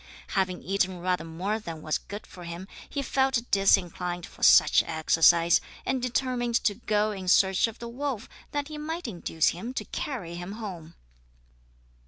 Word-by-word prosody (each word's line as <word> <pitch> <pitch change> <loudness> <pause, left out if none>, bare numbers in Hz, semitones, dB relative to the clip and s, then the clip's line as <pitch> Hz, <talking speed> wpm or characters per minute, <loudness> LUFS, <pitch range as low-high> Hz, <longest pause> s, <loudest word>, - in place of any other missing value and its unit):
Having 185 -2 -1
eaten 190 -1 0
rather 180 -1 0
more 180 +7 -3
than 165 -7 -8
was 155 - 0
good 205 +1 -8
for 180 - -12
him, 170 +2 -7 0.2
he 280 - -3
felt 265 -2 +1
disinclined 180 -3 +2
for - - -16
much - - +7
exercise, 165 +1 +4 0.2
and 260 -1 0
determined 245 -1 -1
to 205 - +2
go 215 0 0
in 190 -3 -6
search 190 +3 +4
of 225 - -9
the 235 - -7
wolf 250 -2 -4 0.2
that 290 -1 -2
he 305 -1 -6
might 320 +1 -4
induce 170 -5 0
him 230 +9 -6
to - - -3
carry 215 - -4
him 175 +3 -6
home. 180 -7 -8
195 Hz, 165 wpm, -27 LUFS, 175-240 Hz, 0.2 s, much